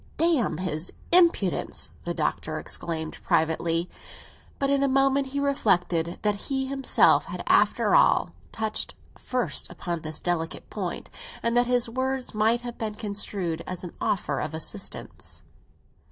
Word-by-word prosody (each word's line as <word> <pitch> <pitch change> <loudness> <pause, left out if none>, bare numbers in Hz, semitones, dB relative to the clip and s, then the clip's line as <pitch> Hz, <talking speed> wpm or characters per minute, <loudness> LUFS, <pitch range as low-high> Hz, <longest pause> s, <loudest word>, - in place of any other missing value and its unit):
"Damn 325 -8 +2
his 175 -2 -3 0.2
impudence!" 340 - +4
the - - -1
Doctor - - -1
exclaimed 160 -2 -4
privately. 165 0 +1 0.7
But 275 0 0
in 280 -1 +3
a 275 - +3
moment 270 +1 +3
he 280 +2 -3
reflected 180 -11 +1
that 210 -1 +3
he 265 -1 0
himself 270 0 +3
had, - - -6
after - - +3
all, - - +4 0.2
touched 220 -1 -1 0.2
first 250 -1 -1
upon 170 -2 -4
this 155 0 -5
delicate 170 -2 -2
point, - - -4 0.3
and 235 0 +1
that 245 0 +4
his 245 -1 +3
words 260 +2 -2
might 220 +3 +2
have 240 -1 -7
been 215 -2 -3
construed 200 -5 -3
as 185 -1 -5
an 175 - -7
offer 195 - 0
of 155 +1 -3
assistance. 195 +5 -5
215 Hz, 140 wpm, -26 LUFS, 170-265 Hz, 0.7 s, impudence